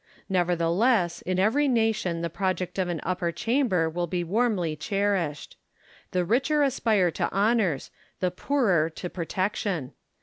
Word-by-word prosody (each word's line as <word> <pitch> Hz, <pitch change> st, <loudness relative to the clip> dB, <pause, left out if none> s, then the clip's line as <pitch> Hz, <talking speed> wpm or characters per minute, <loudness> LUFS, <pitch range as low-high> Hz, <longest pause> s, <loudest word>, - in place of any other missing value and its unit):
Nevertheless, 175 Hz, +2 st, +2 dB
in 185 Hz, 0 st, -2 dB
every 230 Hz, +10 st, +3 dB
nation 220 Hz, -8 st, +1 dB
the 170 Hz, -, -1 dB
project 185 Hz, +1 st, -2 dB
of 185 Hz, -, +1 dB
an 175 Hz, -2 st, -2 dB
upper 175 Hz, -1 st, -1 dB
chamber 225 Hz, -, +1 dB
will 175 Hz, +2 st, -2 dB
be 175 Hz, +1 st, -2 dB
warmly 190 Hz, -4 st, 0 dB
cherished. 195 Hz, -4 st, -2 dB, 0.5 s
The 180 Hz, -1 st, 0 dB
richer 275 Hz, -, +2 dB
aspire 220 Hz, -9 st, +2 dB
to -, -, -2 dB
honours, 200 Hz, -, +1 dB, 0.3 s
the 180 Hz, -1 st, 0 dB
poorer 185 Hz, -, +1 dB
to 175 Hz, +2 st, -7 dB
protection. 185 Hz, -3 st, -2 dB
185 Hz, 135 wpm, -26 LUFS, 170-220 Hz, 0.5 s, every